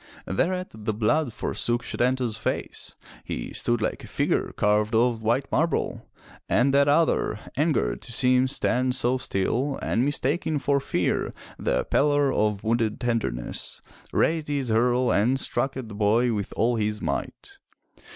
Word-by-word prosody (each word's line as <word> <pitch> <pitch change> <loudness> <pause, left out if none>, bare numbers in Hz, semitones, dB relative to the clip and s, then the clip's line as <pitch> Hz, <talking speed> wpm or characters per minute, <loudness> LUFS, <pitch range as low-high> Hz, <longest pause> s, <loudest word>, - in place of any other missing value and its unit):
Thereat 180 - -1
the 110 -1 -3
blood 120 +6 +1
forsook 120 +2 -1
Setanta's 125 -2 0
face. - - -4 0.3
He - - -5
stood 120 -2 0
like - - -2
a - - -9
figure - - 0
carved 105 +2 +1
of 115 0 +2
white 120 +5 +1
marble. 165 +2 -1 0.4
And 135 +3 +3
that 140 0 +4
other, 145 -7 +2 0.2
angered 150 +3 0
to 125 - -10
see 125 +1 +3
him 130 +1 +3
stand 130 -1 +1
so 125 0 +2
still, 125 +8 -1
and 120 - 0
mistaking 145 +3 0
for 140 0 +1
fear - - -1 0.2
the - - 0
pallor 145 -1 +2
of 105 -2 0
wounded 115 -1 0
tenderness, 115 - -2 0.3
raised 160 -2 +1
his 140 -4 -1
hurle 125 +2 +2
and 125 +6 +2
struck 135 0 -1
at 130 -3 -5
the 110 - -9
boy 110 +4 +2
with 105 -2 -3
all 115 +2 +2
his 105 -1 -1
might. 400 - -5
125 Hz, 150 wpm, -25 LUFS, 110-140 Hz, 0.4 s, that